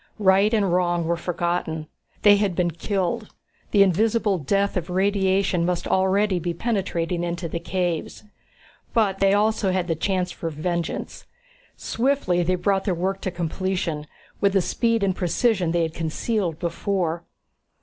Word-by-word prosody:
Right 200 0 +4
and 200 -6 +2
wrong 175 -2 +1
were 170 +1 +1
forgotten. 170 -2 -2 0.4
They 205 -1 +7
had 200 -3 0
been 175 -1 +1
killed 180 +2 -2 0.4
the 200 -2 +6
invisible 205 +1 +2
death 200 +7 0
of 180 -1 -2
radiation 190 -1 +1
must 175 0 -1
already 190 0 +2
be 170 0 -3
penetrating 180 -5 -1
into 175 0 -3
the 170 - -4
caves 175 0 -2 0.7
but 200 -4 +2
they 195 0 +4
also 210 -1 +2
had 185 -1 0
the 165 - +1
chance 180 +2 -1
for 165 - -4
vengeance. 170 +2 -3 0.5
Swiftly 230 -8 0
they 180 +2 +1
brought 195 +2 0
their 190 -4 +1
work 190 +3 -2
to - - -2
completion, 170 -2 -2 0.3
with 200 -1 +2
a 195 - +5
speed 230 +3 0
and 190 -2 +1
precision 185 0 +1
they 170 0 +1
had 160 -1 -2
concealed 170 +2 -2
before. 170 0 -2
185 Hz, 150 wpm, -24 LUFS, 170-200 Hz, 0.7 s, They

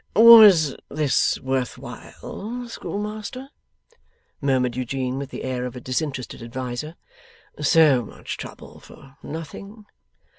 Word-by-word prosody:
'Was 210 - +8
this 150 -2 +1
worth 130 -1 -2
while, 240 +4 -8
Schoolmaster?' 215 +4 -6 0.9
murmured 130 -3 +1
Eugene, 130 +1 -3
with 140 -1 -6
the - - -7
air 130 -1 -3
of 125 0 -5
a - - -6
disinterested 130 0 -4
adviser. 125 +5 -5 0.6
'So 150 -4 +4
much - - -7
trouble - - -10
for 135 0 -17
nothing? 195 +8 -9
140 Hz, 110 wpm, -23 LUFS, 130-200 Hz, 0.9 s, Was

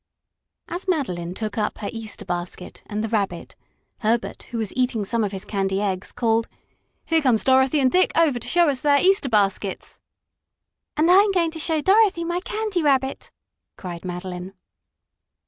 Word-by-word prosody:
As 355 +3 -5
Madeline 185 - -1
took 215 0 -3
up 210 - -1
her 205 - -4
Easter 225 -2 -6
basket 175 0 -5
and 210 0 -3
the - - -1
Rabbit, 200 -6 -2 0.4
Herbert, 230 +1 -1
who 235 - -4
was 220 -3 -3
eating 250 -5 0
some 230 +3 0
of 205 - -1
his 195 -1 -6
candy 195 -1 -1
eggs, 190 -2 -2
called: 225 -1 +1 0.6
"Here 325 -1 +2
come 255 -5 +4
Dorothy 265 +5 +3
and 260 -2 +3
Dick 370 +1 +3
over 305 -7 +3
to - - -8
show 345 -1 +4
us 270 -3 0
their 285 -1 +4
Easter 380 -5 +3
baskets." 200 -3 0 1.0
"And 325 +3 +4
I'm 400 +3 +6
going 340 -4 +1
to 320 - -7
show 320 -1 0
Dorothy 390 -1 +4
my 345 +1 -1
Candy 420 -1 -2
Rabbit!" 270 -3 0 0.5
cried 175 -3 -7
Madeline. 180 +1 -6
235 Hz, 165 wpm, -23 LUFS, 200-325 Hz, 1.0 s, I'm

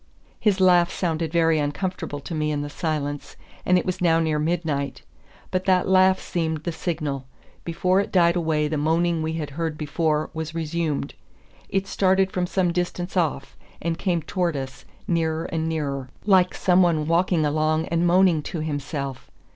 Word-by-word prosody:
His 205 -3 +2
laugh 180 -2 +5
sounded 165 -3 -2
very 165 -2 +3
uncomfortable 145 +1 -3
to 170 - -7
me 155 -1 0
in 145 -1 -1
the 145 - -6
silence; 145 -4 -3 0.3
and 180 - +5
it 180 - -1
was 185 -1 -3
now 165 -2 +4
near 160 -2 0
midnight. 155 -3 -2 0.5
But 185 0 -1
that 185 -1 +3
laugh 190 0 +5
seemed 160 -3 -2
the 170 - -2
signal; 150 -6 -3 0.4
before 180 +3 +1
it 200 - -2
died 170 -2 +4
away 160 -3 +1
the 150 -1 -2
moaning 165 +2 +1
we 160 0 -2
had 155 -3 -4
heard 160 +1 -3
before 155 0 -1
was 160 0 -5
resumed. 160 -3 -2 0.6
It 195 0 0
started 190 0 +2
from 180 -1 -1
some 180 -1 +1
distance 175 +1 -3
off, 145 -6 -1 0.2
and 165 0 -1
came 175 -2 -1
towards 175 -2 -1
us, 135 -1 -7 0.2
nearer 165 -2 0
and 160 -1 -2
nearer, 140 -5 -3 0.2
like 190 -3 +4
some 180 0 +3
one 165 -4 +2
walking 170 -1 +2
along 155 +1 +1
and 170 +1 +1
moaning 175 -2 +4
to 165 +2 -5
himself. 145 -3 -4
165 Hz, 170 wpm, -24 LUFS, 150-180 Hz, 0.6 s, laugh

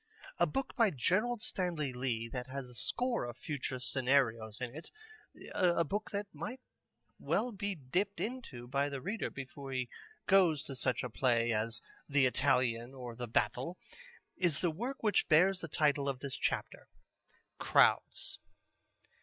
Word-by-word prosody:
A - - +5
book 270 0 -3
by 230 -3 +5
Gerald 210 - +1
Stanley 165 -8 -2
Lee 125 -3 -1
that 125 +1 -5
has 135 0 -5
a 125 - -12
score 245 - +1
of 120 0 -7
future 135 -3 -4
scenarios 125 -4 +1
in 125 -1 -4
it, 160 - -8 0.6
a 175 -2 +3
book 205 +7 -3
that 205 0 -2
might 170 - -5 0.6
well 250 - 0
be 205 -1 -3
dipped 180 +8 -1
into 210 - -5
by 140 +3 +1
the 140 -1 -4
reader 200 - -2
before 135 0 -8
he 130 -2 -1 0.4
goes 180 -7 +5
to 135 - -6
such 125 -3 0
a 125 - -3
play 120 -1 +2
as 115 +2 0 0.3
The 140 -2 +4
Italian 125 -2 +2
or 125 -3 -7
The 120 +1 -5
Battle, 125 +10 0 0.6
is 175 -6 +2
the 175 - +1
work 240 - -5
which 210 -3 +2
bears 180 +4 +5
the 165 - -4
title 145 -2 +2
of 135 - -2
this 135 0 -5
chapter: - - -2 0.7
"Crowds." - - +3
140 Hz, 155 wpm, -34 LUFS, 125-185 Hz, 0.7 s, A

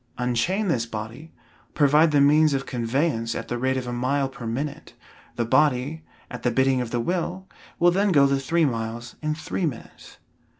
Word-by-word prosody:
Unchain 125 - 0
this 120 -9 0
body, 115 +8 -7 0.4
provide 150 +2 +4
the 145 -1 +3
means 150 +1 +4
of 135 - -2
conveyance 120 -1 -1
at - - -5
the 120 - -2
rate 130 +1 0
of 130 - -3
a 120 - -4
mile 135 +3 0
per 120 -3 -8
minute, 140 +6 -5 0.4
the 120 - -1
body, 145 +4 +1 0.3
at 125 - -7
the 125 - +1
bidding 130 +1 +2
of 120 - -4
the 120 - -2
will, 180 +6 -2 0.3
will 175 +1 +4
then 200 +2 +2
go 140 -5 +5
the 140 0 +1
three 165 +5 +1
miles 115 -1 -4
in 155 0 -1
three 165 +2 -2
minutes. 125 -6 -9
135 Hz, 185 wpm, -24 LUFS, 120-155 Hz, 0.4 s, go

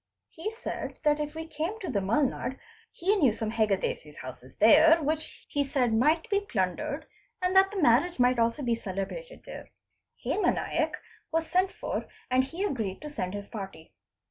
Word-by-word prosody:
He 335 +6 -4
said 450 - -5
that 300 -1 +3
if 300 +1 -3
we 320 0 -4
came 325 +7 -3
to 380 - -5
the 205 - +1
Mulnad 255 +5 0 0.3
he 390 +4 +1
knew 280 - +5
some 220 0 -3
Heggades' 200 -9 -1
houses 130 0 -9
there 315 +10 +7
which 315 +2 -3
he 285 -2 0
said 260 -4 +1
might 305 - +3
be 400 - +4
plundered 235 - -2 0.3
and 365 +1 0
that 385 0 +7
the 400 -1 -4
marriage 290 +4 +4
might 250 0 +4
also 230 +5 +1
be 240 -2 +2
celebrated 230 - -5
there. - - -9 0.6
Hema 425 - +2
Naik - - -1 0.3
was 325 0 +1
sent 370 +3 +2
for - - -4 0.2
and 255 +1 +4
he 330 +8 -4
agreed 220 - -2
to 300 - -6
send 185 -9 -3
his 205 0 -6
party. 195 -7 -8
280 Hz, 175 wpm, -28 LUFS, 220-330 Hz, 0.6 s, there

